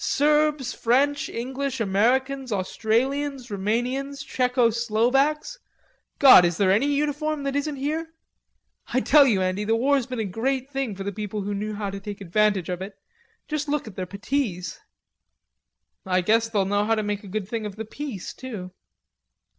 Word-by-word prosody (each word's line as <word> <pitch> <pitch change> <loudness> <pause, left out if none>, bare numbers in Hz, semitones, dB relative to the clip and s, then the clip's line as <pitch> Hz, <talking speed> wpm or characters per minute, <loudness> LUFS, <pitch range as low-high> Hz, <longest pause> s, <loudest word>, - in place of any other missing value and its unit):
Serbs, 300 -2 +2
French, 280 +5 +1
English, 265 +2 -3
Americans, 250 +6 +1
Australians, 245 +6 -1
Rumanians, 245 +8 -2
Tcheco 250 -2 +2
Slovaks; 250 - +1 0.6
God, 265 -10 +9
is 170 -1 +1
there 190 -2 +3
any 220 +9 +3
uniform 295 +1 -1
that 275 0 -2
isn't 285 +1 -1
here?... 305 +4 -2 0.8
I 255 - 0
tell 285 0 +6
you, 195 -6 +2
Andy, 185 +3 -1
the 225 +2 +1
war's 265 +1 +2
been 255 -1 -5
a 220 - -1
great 260 +7 -2
thing 270 -7 -2
for 195 - -6
the 200 - -3
people 210 0 -4
who 205 +1 -3
knew 210 +1 -3
how 205 -1 -3
to 200 - -6
take 205 0 -7
advantage 200 -1 +1
of 180 0 -4
it. 195 +1 -7 0.5
Just 305 -1 -2
look 295 0 -1
at 215 -4 -10
their 185 -1 -4
puttees." 200 -2 -3 1.2
"I 185 -1 +1
guess 225 +4 +2
they'll 205 -4 +1
know 205 +1 +1
how 225 +2 +2
to 215 - -1
make 205 0 -3
a - - -10
good 195 0 -4
thing 220 -1 -3
of 200 - -9
the 220 +1 -6
Peace 240 -4 -6
too." 210 -8 -7
230 Hz, 170 wpm, -24 LUFS, 205-275 Hz, 1.2 s, God